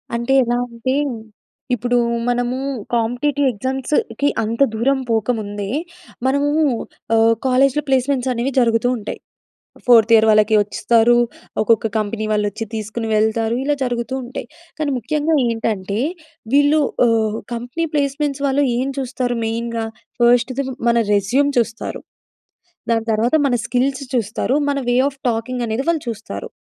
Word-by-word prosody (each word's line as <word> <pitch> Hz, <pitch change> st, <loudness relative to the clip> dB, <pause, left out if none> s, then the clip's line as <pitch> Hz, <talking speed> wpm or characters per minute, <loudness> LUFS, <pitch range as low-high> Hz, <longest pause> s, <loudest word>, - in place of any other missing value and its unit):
అంటే 235 Hz, +3 st, 0 dB
ఎలా 240 Hz, +1 st, 0 dB
అంటే, 235 Hz, +3 st, -2 dB, 0.8 s
ఇప్పుడు 245 Hz, +1 st, +1 dB, 0.3 s
మనము 245 Hz, +1 st, 0 dB, 0.4 s
కాంపిటీటివ్ 260 Hz, +5 st, +1 dB
ఎగ్జామ్స్‌కి 260 Hz, +2 st, -1 dB, 0.2 s
అంత 230 Hz, +5 st, -3 dB
దూరం 265 Hz, +4 st, +1 dB
పోకముందే 215 Hz, -3 st, -1 dB, 0.6 s
మనము 280 Hz, +2 st, +2 dB, 0.7 s
ఆహ్, 225 Hz, 0 st, +5 dB
కాలేజ్‌లో 270 Hz, +3 st, +3 dB
ప్లేస్మెంట్స్ 265 Hz, 0 st, +1 dB
అనేవి 245 Hz, +3 st, -1 dB
జరుగుతూ 230 Hz, 0 st, +2 dB
ఉంటాయి. 210 Hz, -2 st, -6 dB, 0.7 s
ఫోర్త్ 230 Hz, -2 st, +6 dB
ఇయర్ 220 Hz, 0 st, +6 dB
వాళ్ళకి 215 Hz, 0 st, +4 dB
ఒస్తారు. 230 Hz, +3 st, +3 dB, 0.4 s
ఒక్కొక్క 225 Hz, 0 st, +3 dB
కంపెనీ 215 Hz, 0 st, -2 dB
వాళ్ళు 210 Hz, -1 st, +1 dB
ఒచ్చి 225 Hz, +2 st, -5 dB
తీసుకొని 220 Hz, +1 st, -4 dB
వెళ్తారు. 220 Hz, +1 st, +1 dB
ఇలా 290 Hz, +1 st, +1 dB
జరుగుతూ 245 Hz, 0 st, -2 dB
ఉంటాయి. 245 Hz, -, -7 dB, 0.3 s
కానీ 305 Hz, -2 st, -1 dB
ముఖ్యంగా 300 Hz, +6 st, 0 dB
ఏంటంటే 215 Hz, -3 st, -2 dB, 0.6 s
వీళ్ళు 290 Hz, +2 st, +4 dB, 0.3 s
ఆహ్, 220 Hz, -1 st, +1 dB, 0.2 s
కంపెనీ 245 Hz, +8 st, -3 dB
ప్లేస్మెంట్స్ 280 Hz, 0 st, -1 dB
వాళ్ళు 280 Hz, +1 st, +2 dB
ఏం 265 Hz, +2 st, -1 dB
చూస్తారు 250 Hz, -2 st, -2 dB
మెయిన్‌గా. 230 Hz, 0 st, -2 dB, 0.3 s
ఫస్ట్‌ది 245 Hz, +3 st, +3 dB, 0.3 s
మన 235 Hz, -, +2 dB, 0.2 s
రెజ్యూమ్ 245 Hz, +9 st, +2 dB
చూస్తారు. 230 Hz, -1 st, -2 dB, 0.9 s
దాని 225 Hz, -1 st, +1 dB
తర్వాత 230 Hz, +6 st, +1 dB
మన 255 Hz, -, +1 dB
స్కిల్స్ 265 Hz, +3 st, 0 dB
చూస్తారు. 235 Hz, +3 st, 0 dB, 0.2 s
మన 280 Hz, -, 0 dB
వే 245 Hz, -, +2 dB
ఆఫ్ 270 Hz, -1 st, -11 dB
టాకింగ్ 240 Hz, +2 st, -3 dB
అనేది 220 Hz, +4 st, -1 dB
వాళ్ళు 330 Hz, -3 st, +1 dB
చూస్తారు. 215 Hz, -, -6 dB
240 Hz, 130 wpm, -19 LUFS, 225-265 Hz, 0.9 s, ఫోర్త్